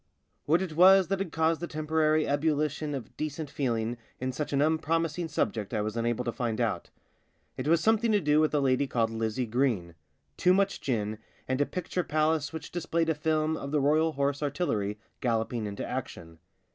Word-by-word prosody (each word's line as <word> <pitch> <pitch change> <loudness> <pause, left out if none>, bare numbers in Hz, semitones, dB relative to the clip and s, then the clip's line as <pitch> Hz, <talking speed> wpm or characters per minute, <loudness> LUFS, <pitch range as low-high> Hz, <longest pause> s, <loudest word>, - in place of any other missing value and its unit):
What 165 +5 +3
it 175 -4 -5
was 190 +1 +7
that 195 -1 0
had 195 -4 -3
caused 160 0 +1
a 175 - -3
temporary 155 0 +1
ebullition 150 0 0
of 130 - -8
decent 155 -1 -4
feeling 120 -5 -1 0.2
in 130 0 -2
such 150 +4 -4
an 140 - +1
un 155 +2 +3
promising 165 +1 -1
subject 110 -9 -2
I - - +1
was 110 +1 -3
unable 120 +1 -1
to 120 - 0
rind 115 -3 -1
out. - - -1 0.7
It 130 - -4
was 165 0 +4
something 220 +3 +3
to 210 - +4
do 150 -3 +3
with 155 0 +3
a - - +3
lady 135 0 +2
called 115 -3 0
Lizzie 115 +2 -1
Green, 115 -8 0 0.4
too 180 +1 +4
much 195 0 +1
gin, 110 -4 -2 0.3
and 130 +2 0
a 145 - +2
picture 180 0 -3
palace 155 -1 +1
which 160 - -7
displayed 165 -1 -1
a - - +3
film 155 +1 0
of 140 - -5
the 150 +1 +1
Royal 155 +3 +2
Horse 140 0 -1
Artillery 135 - -1 0.2
galloping 115 -2 -1
into 100 -1 -5
action. 85 -10 -6
150 Hz, 195 wpm, -28 LUFS, 120-160 Hz, 0.7 s, was